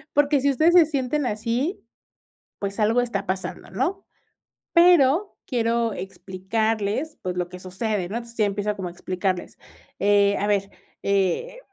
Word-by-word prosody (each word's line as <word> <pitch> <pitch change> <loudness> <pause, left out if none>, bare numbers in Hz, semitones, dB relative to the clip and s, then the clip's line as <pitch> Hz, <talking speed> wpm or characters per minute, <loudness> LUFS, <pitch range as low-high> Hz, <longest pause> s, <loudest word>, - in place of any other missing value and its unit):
"Porque, 290 -1 +4
si 280 - +2
ustedes 315 +6 +3
se 340 -4 +8
sienten 280 -1 -1
así, 235 - -1 0.8
pues, 200 +2 -4
algo 225 +3 +3
está 205 -5 -2
pasando, 190 0 -4
¿no? 335 - -2 0.7
Pero 340 +1 +5
quiero 230 -2 0
explicarles, 205 - -2
pues, 180 -1 -3
lo 175 -1 -1
que 180 - -9
sucede, 190 0 -2
¿no?". 215 - -4
Entonces, 235 0 -7
ya 215 - +3
empiezo 205 +1 -1
como 190 -2 -4
a 175 - -9
explicarles: 185 0 -3 0.4
"Eh, 200 0 +4
a 205 - -1
ver, 200 -1 +1 0.3
eh 200 - 0
220 Hz, 150 wpm, -24 LUFS, 195-270 Hz, 0.8 s, se